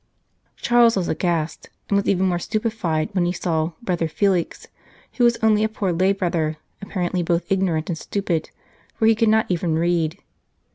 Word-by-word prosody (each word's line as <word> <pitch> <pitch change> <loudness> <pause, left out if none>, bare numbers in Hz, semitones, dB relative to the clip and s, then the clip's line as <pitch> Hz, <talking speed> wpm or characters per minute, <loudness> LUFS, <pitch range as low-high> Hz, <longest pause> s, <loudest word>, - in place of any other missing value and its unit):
Charles 240 -1 +4
was 180 - -1
aghast, 165 -1 -2 0.2
and 200 - 0
was 200 - +1
even 190 -1 +2
more 175 -2 +1
stupefied 215 -7 -1
when 185 -3 +1
he - - +1
saw 165 -2 -1
" - - -40
Brother 175 -6 0
Felix," 180 +1 -1 0.5
who 250 - +2
was 235 -1 +4
only 215 -1 +4
a 220 - +1
poor 195 -4 -2
lay 185 +3 +2
brother, 170 -5 -1 0.2
apparently 185 -2 -2
both 170 +1 -1
ignorant 180 -5 +1
and 170 - -3
stupid, 175 -5 -2 0.5
for 220 - 0
he 225 - +6
could 225 0 +2
not 220 0 +3
even 170 -2 0
read. 170 0 0
180 Hz, 180 wpm, -22 LUFS, 170-210 Hz, 0.5 s, he